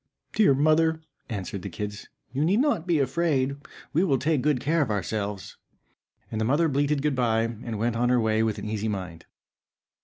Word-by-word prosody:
"Dear 200 -11 +4
mother," 155 +3 +3 0.3
answered 100 -3 -4
the 100 - -5
kids, 105 +3 -6 0.2
"you 140 +3 0
need 190 +7 +3
not 260 - +1
be 170 -3 +3
afraid, 140 -1 +1 0.4
we 165 +5 +3
will 140 -8 +2
take 150 +1 +1
good 145 -1 +2
care 160 +6 +1
of 135 - 0
ourselves." 105 0 -3 0.7
And 110 - -2
the - - +1
mother 145 +7 +3
bleated 145 0 +1
good 150 -1 +2
bye, 115 -3 +2
and 115 0 -4
went 115 +2 0
on 120 +1 +1
her 125 0 +4
way 110 -1 +2
with 110 -2 0
an - - -6
easy 110 0 -2
mind. 90 -6 -5
125 Hz, 190 wpm, -26 LUFS, 110-150 Hz, 0.7 s, Dear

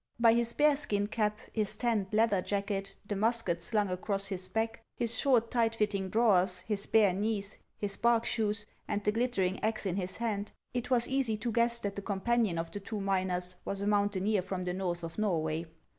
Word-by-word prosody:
By 230 -1 +6
his 235 0 +2
bearskin 280 -9 +2
cap, 210 -1 0 0.2
his 215 -3 +1
tanned 225 -5 0
leather 215 -3 +3
jacket, 200 0 -2
the 205 - -3
mus 230 +3 +2
ket 170 0 -1
slung 210 +3 +1
across 195 +2 -1
his 190 -2 -3
back, 225 0 -2
his 230 -1 0
short, 240 -3 +3
tight 230 -2 +2
fitting 205 -3 0
drawers, 190 -5 +3
his 205 -2 -2
bare 210 -4 +4
knees, 200 +1 -2 0.2
his 200 -1 -2
bark 235 -1 +3
shoes, 210 -2 0 0.2
and 205 - -2
the 210 - +2
glittering 210 -5 0
axe 220 0 0
in 190 -1 -1
his 185 -1 -3
hand, 215 -3 -2 0.2
it 245 0 -3
was 240 -2 +2
easy 260 -5 0
to 235 +2 -2
guess 235 +1 +2
that 200 -4 -4
the 200 - -4
companion 205 -1 0
of 165 0 -3
the 205 - -5
two 210 +2 -5
miners 185 -2 0
was 195 0 -3
a - - -1
mountaineer 205 0 +2
from 185 0 -4
the 180 0 -2
north 180 -2 -2
of 165 +4 -6
Norway. 165 -5 0
205 Hz, 200 wpm, -31 LUFS, 190-230 Hz, 0.2 s, By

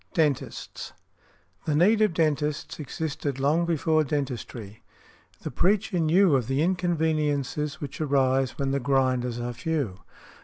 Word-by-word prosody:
DENTISTS. 150 -5 -2 0.7
The 150 - 0
need 210 +8 +4
of 210 -6 +2
dentists 150 -2 -1
existed 145 -2 -4
long 155 +5 +2
before 160 -1 +2
dentistry. 125 -6 -4 0.6
The - - -4
Preacher 190 - +1
knew 165 +1 +4
of 125 -4 0
the 135 +3 +1
inconveniences 155 -5 0
which 145 +1 -6
arise 135 -3 +1
when 135 -1 -1
the 140 - 0
grinders 130 -2 +1
are 120 0 -3
few. 120 - -2
145 Hz, 125 wpm, -26 LUFS, 135-160 Hz, 0.7 s, need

